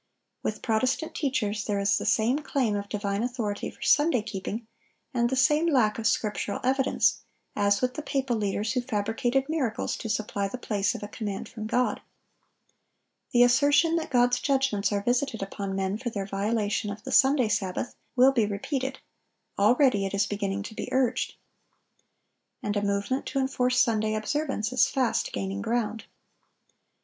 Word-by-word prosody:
With 215 - -3
Protestant 255 +8 0
teachers 220 -8 -1
there 205 -2 -1
is 200 0 +2
the - - -4
same 240 +6 +2
claim 265 -8 0
of 200 0 -4
divine 205 -1 -2
authority 235 -4 -2
for - - -11
Sunday 295 -6 +3
keeping, 215 +1 -5 0.5
and 240 -1 +2
the 265 - 0
same 295 +5 +3
lack 235 -9 +2
of 225 - +1
scriptural 210 -2 -1
evidence, 265 +1 +2 0.3
as 200 -1 +2
with 250 0 0
the 305 - -5
papal 270 -4 -1
leaders 210 +1 -1
who 250 - +1
fabricated 245 +3 -1
miracles 280 -8 -1
to 225 - -6
supply 210 -2 -1
the 225 - -6
place 205 -4 -1
of - - -7
a - - -4
command 205 -2 -5
from 215 -2 -6
God. 250 +3 0 1.3
The 245 -1 +6
assertion 290 +6 +4
that 325 - -3
God's 245 -1 +3
judgments 265 -8 +1
are 200 -1 -1
visited 245 -2 0
upon 195 0 -4
men 195 +2 -1
for 250 -1 -3
their 200 -4 -4
violation 205 +1 -1
of 205 +1 -7
the - - -6
Sunday 265 -3 +5
sabbath, 205 +1 -2 0.2
will 260 +2 +6
be 230 -6 +2
repeated; 265 +6 -3 0.6
already 215 -1 +4
it 195 - -4
is 200 +1 +2
beginning 200 -1 -2
to 220 - -8
be - - -5
urged. 255 -2 0 1.3
And 205 0 -1
a 205 - +1
movement 200 +6 -1
to - - -3
enforce 255 -1 +1
Sunday 220 -3 +2
observance 255 0 -2
is 255 - +4
fast 260 -3 0
gaining 195 +1 -3
ground. 225 -1 -2
225 Hz, 165 wpm, -27 LUFS, 205-260 Hz, 1.3 s, The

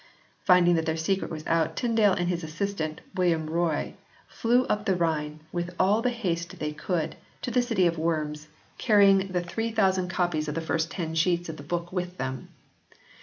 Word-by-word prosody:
Finding 180 -2 +6
that 160 -1 0
their 160 0 0
secret 190 +4 -1
was 155 -1 -6
out 165 -1 +1
Tyndale 225 -5 +3
and 175 -1 -1
his 175 -1 -1
assistant, 160 -1 -3
William 170 -4 +1
Roye, 165 -1 -1 0.3
fled 245 +2 +2
up 210 0 -1
the 190 - +3
Rhine, 155 -3 -1
with 175 0 -3
all 205 +4 +4
the 250 - +2
haste 180 -6 -3
they 150 -1 -3
could, 160 +1 -2 0.3
to 245 - -2
the 250 +1 +3
city 225 -7 +1
of 170 -1 +1
Worms, 155 -2 -2 0.3
carrying 200 -4 +5
the 180 -2 -1
3000 190 -1 0
copies 175 -4 0
of 150 - -3
the - - 0
first 160 0 -1
ten 165 -3 -4
sheets 170 +1 +1
of 160 - -6
the - - -8
book 170 +4 -4
with 180 -1 -3
them. 130 -1 -4
175 Hz, 185 wpm, -27 LUFS, 160-195 Hz, 0.3 s, Finding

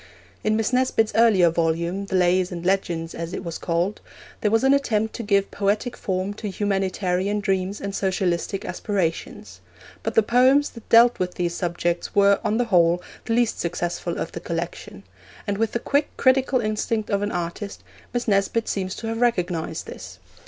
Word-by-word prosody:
In 215 0 +2
Miss 225 +2 0
Nesbit's 250 -4 +2
earlier 205 -7 +5
volume, 170 +4 -1
the 190 - -2
Lays 180 0 +2
and 175 -1 -6
Legends, 175 -3 0
as 165 +1 -5
it - - -4
was 170 -2 -5
called, 175 +4 -1 0.4
there 210 - +1
was 225 +3 +2
an 270 +1 +5
attempt 220 -6 +1
to - - -5
give 200 -2 +1
poetic 205 +4 -1
form 190 +1 -2
to 210 0 -5
humanitarian 195 0 -1
dreams 195 -1 -1
and 200 0 -5
socialistic 190 0 -1
aspirations; 185 -6 -3 0.4
but - - -3
the 225 - +5
poems 260 +6 +4
that 230 - -13
dealt 235 +1 +6
with 180 -1 -2
these 175 -1 -1
subjects 175 -1 -2
were, 200 0 +5
on 215 - +1
the 245 - +1
whole, 175 -5 +3 0.3
the 230 - -1
least 240 -1 +1
successful 175 0 -3
of 165 - -3
the - - -6
collection; 170 - -5 0.4
and 200 0 -2
with 225 -1 +1
the - - +1
quick, 285 +4 +1
critical 260 0 +3
instinct 215 0 -2
of 200 0 +1
an 205 +1 -1
artist, 175 +4 -5 0.3
Miss 245 0 -2
Nesbit 205 +2 +1
seems 190 -1 -2
to - - -7
have 225 +1 -3
recognised 180 -9 0
this. - - -9
200 Hz, 180 wpm, -23 LUFS, 175-225 Hz, 0.4 s, dealt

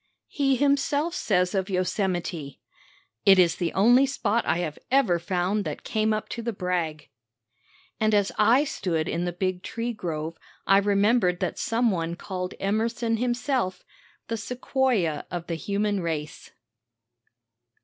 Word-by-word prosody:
He 275 -3 +1
himself 285 +4 +1
says 180 - +1
of 190 0 -1
Yosemite: 180 -5 -2 0.6
"It 195 -1 +7
is 175 -3 +4
the 175 -2 -1
only 245 +7 +5
spot 235 -4 0
I - - +2
have 165 -4 -3
ever 250 -10 +3
found 185 +4 -1
that 150 - -5
came 220 0 0
up 215 0 -1
to 235 - -4
the 235 +1 -2
brag." 175 -6 -3 0.9
And 215 -1 +3
as 205 -1 +2
I 230 +7 +5
stood 170 - -2
in 170 +2 -1
the 175 - -1
big 185 +1 -2
tree 235 +4 -4
grove 165 -5 -5 0.3
I 195 0 +5
remembered 200 -2 +2
that - - -2
some 230 0 +1
one 170 -2 -2
called 180 0 -5
Emerson 225 +3 0
himself 245 -3 -1 0.4
"the 230 - -2
Sequoia 245 - 0
of 175 -1 -5
the 170 - -4
human 200 +4 -1
race." 155 -4 -4
195 Hz, 145 wpm, -26 LUFS, 175-235 Hz, 0.9 s, It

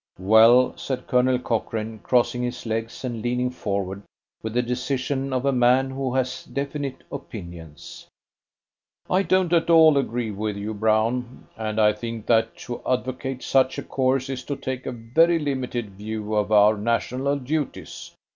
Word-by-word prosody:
"Well," 110 +6 +5
said 130 -2 -4
Colonel 125 0 +2
Cochrane, 110 -2 -3
crossing 120 +1 +1
his 125 0 -4
legs 115 +3 -3
and 120 -3 -4
leaning 125 +2 -1
forward 100 -4 -3 0.4
with 110 0 -5
the 125 - +2
decision 130 +2 -2
of 130 0 -1
a 140 - +3
man 130 +1 +3
who 130 -1 -3
has 130 -1 -1
definite 140 -1 -4
opinions, 85 - -9 1.0
"I 185 - +4
don't 185 -3 +1
at 170 0 +2
all 160 -3 +7
agree 120 -4 -2
with 105 0 -3
you, 105 +2 -4
Brown, 110 +4 0
and 110 -1 -3
I 105 -1 +5
think 115 0 -6
that 115 -1 +2
to 120 - -6
advocate 130 +1 -2
such 130 -1 +2
a - - -4
course 130 0 0
is 130 -1 -5
to 140 - -3
take 130 -2 -5
a - - -2
very 130 +9 +2
limited 130 -7 -3
view 105 +2 -5
of 105 0 0
our 105 0 +5
national 125 +5 0
duties. 145 +2 -4
125 Hz, 155 wpm, -24 LUFS, 110-130 Hz, 1.0 s, all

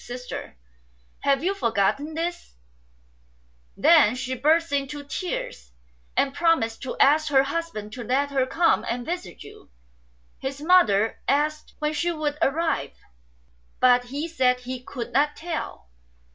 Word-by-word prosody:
Sister, 250 - -7 0.6
have 275 +1 +1
you 380 +3 +1
forgotten 275 - 0
this? 335 - -4 0.6
' - - -37 0.5
Then 295 -2 +5
she 255 0 -3
burst 315 +6 +2
into 285 +1 -2
tears, 280 - -5 0.4
and 270 -1 +2
promised 320 -10 +1
to 260 - -5
ask 300 +3 +4
her 270 -2 +5
husband 275 -8 -4
to 245 - -6
let 275 +5 0
her 265 -2 +1
come 335 +5 +2
and 240 0 -3
visit 325 - -5
you." - - -15 0.7
His 270 +1 -5
mother 285 - +3
asked 305 +2 0
when 300 0 -1
she 345 +3 0
would 305 -2 -3
arrive; 320 +4 0 0.8
but 245 -1 +5
he 285 +6 -4
said 255 -6 +1
he 250 0 -6
could 240 -2 -7
not 295 +3 +2
tell. 320 - -6
280 Hz, 140 wpm, -24 LUFS, 245-315 Hz, 0.8 s, Then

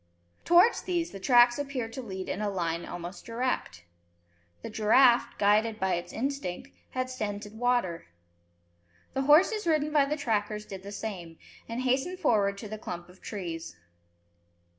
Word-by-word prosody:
Towards 355 +7 +5
these 345 -2 -2
the 195 - -8
tracks 240 +3 +5
appeared 260 -5 -4
to 265 - -5
lead 190 -5 -6
in 205 - -3
a 210 - 0
line 170 -3 -2
almost 175 +1 -7
direct. 230 - -3 0.8
The - - -5
giraffe, 240 +3 +4
guided 215 +2 +2
by 190 -1 +1
its 175 0 -3
instinct, 260 - -3 0.2
had 255 0 -2
scented 210 -4 -5
water. 240 - 0 1.1
The 270 - 0
horses 340 - +4
ridden 305 -2 +1
by 290 -2 +5
the 300 +2 -2
trackers 210 -5 -1
did 195 -1 -8
the 200 +1 -9
same, 180 -7 -6 0.3
and 230 +2 -3
hastened 265 +8 0
forward 210 - +2
to 215 - -7
the 215 +1 -7
clump 175 -4 -7
of 180 +1 -18
trees. 170 - -6
220 Hz, 155 wpm, -28 LUFS, 190-265 Hz, 1.1 s, Towards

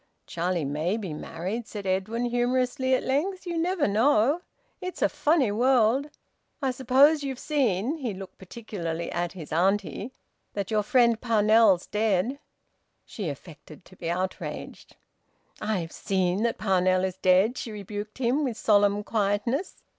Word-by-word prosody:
"Charlie 170 - -2
may 155 +8 -1
be 190 -8 -5
married," 185 +9 -5
said 205 -2 -7
Edwin 195 +6 -1
humorously, 250 +2 +1
at - - -2
length. 365 +9 -1
"You 345 -1 -3
never 350 -1 +1
know! 240 - +3 0.4
It's 365 -1 -4
a - - +5
funny 295 -8 +2
world! 250 +4 +3 0.5
I 270 -3 0
suppose 270 +4 +4
you've 270 -2 -3
seen," 260 - 0
he 255 -7 -3
looked 195 -1 -9
particularly 180 -5 -5
at 175 0 -2
his 165 -5 -8
auntie, 195 +5 0 0.4
"that 200 0 -4
your 215 -1 +2
friend 235 +1 +3
Parnell's 215 -4 +4
dead?" 215 +4 0 0.7
She 200 -7 -5
affected 155 +2 -11
to 185 - -17
be 170 -2 -5
outraged. 185 +2 -5 0.7
"I've 190 -7 -2
seen 190 0 0
that 235 0 0
Parnell 185 -2 +2
is 190 -1 -2
dead," 190 +7 +3
she 230 - -5
rebuked 210 +1 -7
him, 260 +4 +1
with 245 -5 -2
solemn 205 -1 +3
quietness. 215 - -1
215 Hz, 145 wpm, -26 LUFS, 185-255 Hz, 0.7 s, a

